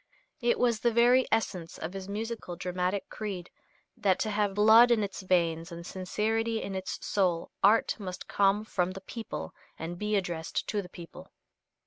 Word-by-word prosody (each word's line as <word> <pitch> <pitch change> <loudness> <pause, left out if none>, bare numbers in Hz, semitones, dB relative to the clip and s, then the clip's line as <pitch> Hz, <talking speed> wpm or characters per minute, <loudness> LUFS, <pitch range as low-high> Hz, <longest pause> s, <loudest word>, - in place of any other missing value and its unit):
It 240 0 +2
was 235 -3 +2
the 240 - +3
very 245 +3 +5
essence 185 -7 -1
of 160 +3 -5
his 195 0 -6
musical 215 -3 -4
dramatic 180 +2 -2
creed 195 -5 -6 0.4
that 190 -3 +2
to 215 - 0
have 205 -1 0
blood 220 +3 +7
in 230 -3 +3
its 200 0 -5
veins 170 -3 +1
and 170 0 -8
sincerity 220 +5 -1
in 195 - -5
its 190 0 -4
soul 180 -4 0
art 215 +3 +4
must 185 -3 -6
come 200 +1 +2
from 185 -3 -1
the 195 - -8
people 225 +3 -6 0.2
and 170 +2 -6
be 210 0 0
addressed 175 -4 -2
to 210 - 0
the 180 - -11
people. 170 -2 -11
195 Hz, 170 wpm, -29 LUFS, 180-220 Hz, 0.4 s, blood